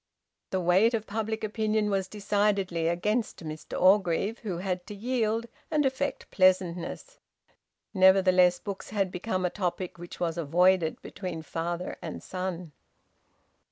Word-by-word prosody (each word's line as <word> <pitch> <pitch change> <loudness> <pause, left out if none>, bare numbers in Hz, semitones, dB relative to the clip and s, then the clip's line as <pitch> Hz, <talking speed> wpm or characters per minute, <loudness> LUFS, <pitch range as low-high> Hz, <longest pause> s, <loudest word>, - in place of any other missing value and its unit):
The 190 - 0
weight 185 +7 +4
of 220 -1 -3
public 220 +1 -3
opinion 215 -1 0
was 195 -1 0
decidedly 200 -4 0
against 205 +2 -1
Mr 155 0 -6
Orgreave, 195 +3 +3
who 195 -6 -4
had 180 0 -3
to 210 - -7
yield 225 0 0 0.2
and 300 -2 +2
affect 270 +2 -2
pleasantness. 185 - +1 0.7
Nevertheless 185 -2 +5
books 200 0 -7
had 195 -3 0
become 185 0 -2
a 180 - 0
topic 180 -2 -3
which 175 0 -9
was 170 -1 -1
avoided 175 +2 +3
between 180 -4 -6
father 170 +3 -4
and - - -6
son. 180 -3 -4
190 Hz, 130 wpm, -28 LUFS, 175-210 Hz, 0.7 s, Nevertheless